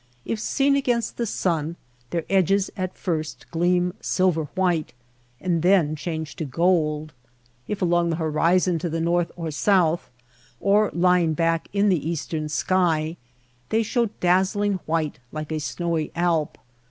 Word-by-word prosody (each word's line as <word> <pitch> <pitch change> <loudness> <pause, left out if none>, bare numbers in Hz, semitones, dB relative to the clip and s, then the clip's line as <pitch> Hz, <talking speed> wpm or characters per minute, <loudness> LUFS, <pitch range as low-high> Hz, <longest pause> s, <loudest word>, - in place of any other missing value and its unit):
If 225 - -2
seen 275 +5 +2
against 245 -4 0
the 235 - -1
sun 165 -4 -1 0.3
their 170 -2 -2
edges 195 +1 +2
at 185 -2 -4
first 155 -3 -3
gleam 175 +1 +1
silver 180 -4 +1
white 175 -7 0 0.5
and 175 -3 0
then 175 -4 +3
change 160 -1 -5
to 165 - -3
gold; 155 0 +1 0.5
if 205 -2 -2
along 175 -1 +2
the 165 - 0
horizon 170 +2 +2
to 170 - -2
the 165 +1 -2
north 170 +1 +1
or 165 -2 -4
south, 175 0 +2 0.5
or 205 +1 +3
lying 175 -2 +3
back 165 0 +1
in 205 +1 +2
the 165 -4 +1
eastern 155 -1 -3
sky, 165 -1 +1 0.5
they 225 +1 +2
show 235 +2 +1
dazzling 190 +2 +2
white 155 -4 -1
like 155 0 -5
a 155 - -1
snowy 165 0 -2
Alp. 170 -3 0
175 Hz, 145 wpm, -24 LUFS, 160-185 Hz, 0.5 s, then